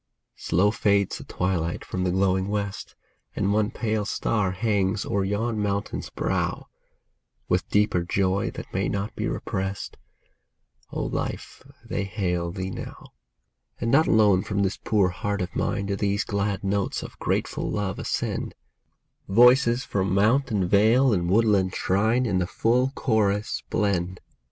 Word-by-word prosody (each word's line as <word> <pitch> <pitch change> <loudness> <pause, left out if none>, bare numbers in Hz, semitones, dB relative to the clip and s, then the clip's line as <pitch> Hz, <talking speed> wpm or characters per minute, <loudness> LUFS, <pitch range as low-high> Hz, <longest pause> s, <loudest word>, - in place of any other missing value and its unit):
Slow 100 +4 +2
fades 100 -2 +1
the - - -8
twilight 85 -2 -2
from 90 - -3
the - - +1
glowing 95 +1 +1
west, 100 -1 -4 0.4
And 100 0 +1
one 105 0 +2
pale 110 -2 -1
star 105 -1 0
hangs 100 0 0
o'er 100 0 0
yon 105 +3 -1
mountain's 100 0 -2
brow; - - -2 0.8
With - - 0
deeper 105 -3 +2
joy, 95 +2 0
that - - -9
may 95 0 0
not 100 +1 -3
be - - -2
repressed, 95 +1 -4 0.9
O - - -3
Life, - - -4 0.2
they 100 - -2
hail 90 -3 -2
thee 95 0 -4
now! - - -9 0.7
And 115 - -1
not 155 +4 +5
alone 105 -4 +4
from 100 +1 -1
this 95 +1 -1
poor 105 -5 +2
heart 100 +3 -3
of 90 - -7
mine 100 -1 -1
Do 100 0 -1
these 100 +1 0
glad 100 -1 -2
notes 100 0 -1
of - - -10
grateful - - -1
love 100 -2 -2
ascend; - - -3 0.7
Voices 125 +3 +5
from 95 -1 -1
mount 115 +8 +3
and 100 -5 0
vale 115 +6 +4
and 85 -3 0
woodland 100 -3 +3
shrine 110 +7 +1
In 95 -5 +1
the 90 - 0
full 120 +7 +1
chorus 105 -2 0
blend. 95 -3 0
100 Hz, 150 wpm, -25 LUFS, 95-110 Hz, 0.9 s, not